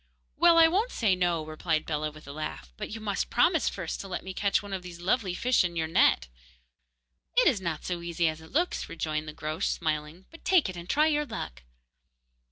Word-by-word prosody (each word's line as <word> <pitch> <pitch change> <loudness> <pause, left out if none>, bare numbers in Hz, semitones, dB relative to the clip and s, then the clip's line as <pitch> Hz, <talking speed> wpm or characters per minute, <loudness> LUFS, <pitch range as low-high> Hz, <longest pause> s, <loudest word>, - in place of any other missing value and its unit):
'Well, 340 +1 +6
I 325 0 +9
won't 405 +9 +1
say 210 -5 +2
"No,"' 175 -3 0
replied 155 0 -1
Bellah, 155 -1 -1
with 155 -1 -14
a - - -6
laugh, 65 - -6
'but - - -6
you 225 - -6
must 205 -2 -2
promise 320 +6 +3
first 175 -5 -5
to 195 - -8
let 185 - -4
me 190 - -6
catch 200 +1 +1
one 200 -1 -7
of 190 - -3
those 175 -1 -10
lovely 185 0 0
fish 250 +3 +3
in 175 -1 -2
your 160 -1 0
net.' 65 - +3 1.1
'It - - +6
is 220 -9 +3
not 170 -4 -3
so 175 -1 -3
easy 170 0 0
as 155 0 -3
it 160 - -14
looks,' 345 +5 0
rejoined 155 -1 -3
the 155 - -6
Groac'h, 155 +1 -2
smiling, 155 +3 -2
'but 330 - -14
take 365 - +4
it, 185 - -6
and 175 0 -9
try 300 +1 +4
your 300 -1 +1
luck. 65 - -6
175 Hz, 220 wpm, -28 LUFS, 155-230 Hz, 1.1 s, I